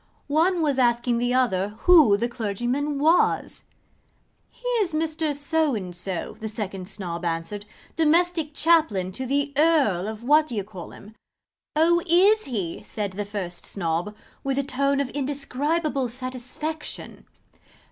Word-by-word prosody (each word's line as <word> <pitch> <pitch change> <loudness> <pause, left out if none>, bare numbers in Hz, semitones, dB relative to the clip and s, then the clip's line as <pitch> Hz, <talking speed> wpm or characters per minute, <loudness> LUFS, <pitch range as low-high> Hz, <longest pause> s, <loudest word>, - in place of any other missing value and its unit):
One 330 +4 +2
was 285 -3 +1
asking 240 -1 +2
the 245 +1 +1
other 205 -5 +1
who 310 - +6
the 235 +3 0
clergyman 240 +5 -2
was? 320 +5 +2 0.8
'He - - -10
is 370 -6 0
Mr. 315 -1 -1
So 295 -1 0
and 185 -4 -5
so,' 180 0 -5
the 220 - -4
second 195 -4 -5
Snob 180 -4 -4
answered, 170 +5 -3 0.3
'domestic 325 -1 +2
chaplain 295 - +3
to 260 +7 -4
the 285 +2 0
Earl 280 - +3
of 220 +1 -6
What 300 +4 +4
d'ye 220 -7 -3
call'im.' 200 +2 -11 0.6
'Oh, 340 +3 +4
is 395 +6 +5
he' 200 -10 -3
said 205 -3 -4
the 205 +2 -4
first 190 -4 -6
Snob, 175 +2 -2 0.3
with 275 -1 -1
a 280 - +1
tone 275 +1 0
of 275 - -3
indescribable 285 0 -1
satisfaction. 255 +5 -6
255 Hz, 135 wpm, -24 LUFS, 205-310 Hz, 0.8 s, who